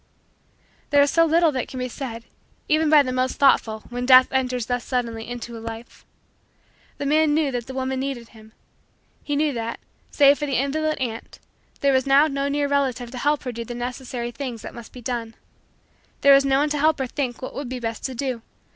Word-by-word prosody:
There 285 -1 +5
is 285 - +1
so 330 0 +4
little 330 0 +3
that 260 -4 -3
can 260 - -8
be 250 - -2
said, 235 -2 -6 0.4
even 310 0 +2
by 300 -2 +7
the 255 - -3
most 255 0 0
thoughtful, 220 -6 +3
when 245 0 -3
Death 255 -1 +8
enters 250 -3 0
thus 245 0 -2
suddenly 230 -3 -3
into 240 -1 -6
a - - -7
life. 225 +1 -9 0.9
The 285 - -4
man 305 +1 +3
knew 305 -3 +1
that 245 -2 -4
the 260 - -7
woman 260 0 -2
needed 260 -4 -4
him. 220 -1 -17 0.7
He 290 - -3
knew 295 0 +1
that, 230 -1 -4 0.3
save 285 0 +5
for 295 - -2
the 275 - 0
invalid 305 +4 0
aunt, 230 -4 -5 0.4
there 280 -1 +3
was 260 0 +1
now 275 +2 +6
no 280 -2 -1
near 285 0 0
relative 260 -4 -1
to 255 - -6
help 295 +3 +1
her 250 - -3
do 235 0 -5
the 240 +1 -7
necessary 245 0 -5
things 245 -3 -6
that - - -8
must 235 -2 -11
be 250 - -11
done. 230 -2 -4 0.9
There 280 0 +7
was 275 0 +5
no 270 -1 +3
one 295 +2 +2
to 295 - -1
help 310 +1 +3
her 265 - -1
think 255 -1 -3
what - - -5
would 280 -3 -5
be 255 0 -4
best 230 -1 -4
to 260 - -4
do. 255 -2 -3
260 Hz, 220 wpm, -23 LUFS, 240-285 Hz, 0.9 s, Death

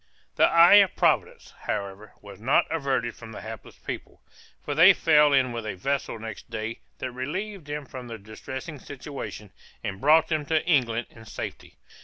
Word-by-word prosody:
The - - +5
eye 170 +4 +8
of 195 -2 +5
Providence, - - +1
however, 100 +1 -4
was 100 -1 -12
not 130 +5 +3
averted 135 -7 -1
from 115 -1 -11
the - - -8
hapless 110 0 -9
people, - - -7 0.5
for 145 - -2
they 170 +6 +8
fell 150 -3 +5
in 130 -3 +3
with 115 -1 -4
a 110 - -4
vessel 135 +4 -2
next 110 -1 -8
day 110 +1 -4 0.2
that 130 - -4
relieved 170 +8 -5
them 145 0 -4
from 130 -1 -9
their 115 -1 -7
distressing 130 - -8
situation, 135 -7 -8 0.3
and 95 -1 -5
brought 155 +3 +5
them 155 -2 -1
to 160 -1 +1
England 120 -8 +2
in 115 -1 -14
safety. - - -8
130 Hz, 175 wpm, -26 LUFS, 110-150 Hz, 0.5 s, eye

